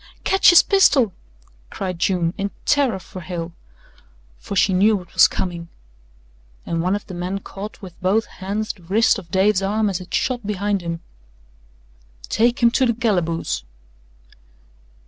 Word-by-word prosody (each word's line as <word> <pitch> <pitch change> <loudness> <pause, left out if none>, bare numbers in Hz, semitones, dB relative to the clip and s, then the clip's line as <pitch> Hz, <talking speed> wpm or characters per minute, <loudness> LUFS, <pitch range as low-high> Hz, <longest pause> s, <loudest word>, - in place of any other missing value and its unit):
"Ketch 385 - +5
his 350 -1 +8
pistol," 275 - +4 0.6
cried 185 -3 -5
June, 175 -2 +1
in 200 0 -3 0.2
terror 275 -8 +2
for 185 0 -10
Hale 170 0 -6 0.9
for 200 - -6
she 190 +1 +3
knew 205 +4 +4
what 180 -3 -8
was - - +7
coming, 170 -2 -4 1.0
and 165 -1 -2
one 185 +3 +1
of 205 - -6
the 190 - -9
men 180 +2 -3
caught 205 +3 -9
with 180 -3 -11
both 200 +5 +2
hands 205 +3 -4
the 185 - -21
wrist 200 +7 +2
of 170 - -14
Dave's 190 +2 +2
arm 210 +1 0
as 185 -1 -4
it 185 - -12
shot 245 -2 -1
behind 205 -1 -1
him. 170 -1 -5 1.3
"Take 235 +2 +1
him 235 - +6
to 260 +1 +2
the 235 - 0
calaboose!" 175 - -1
195 Hz, 155 wpm, -21 LUFS, 180-220 Hz, 1.3 s, his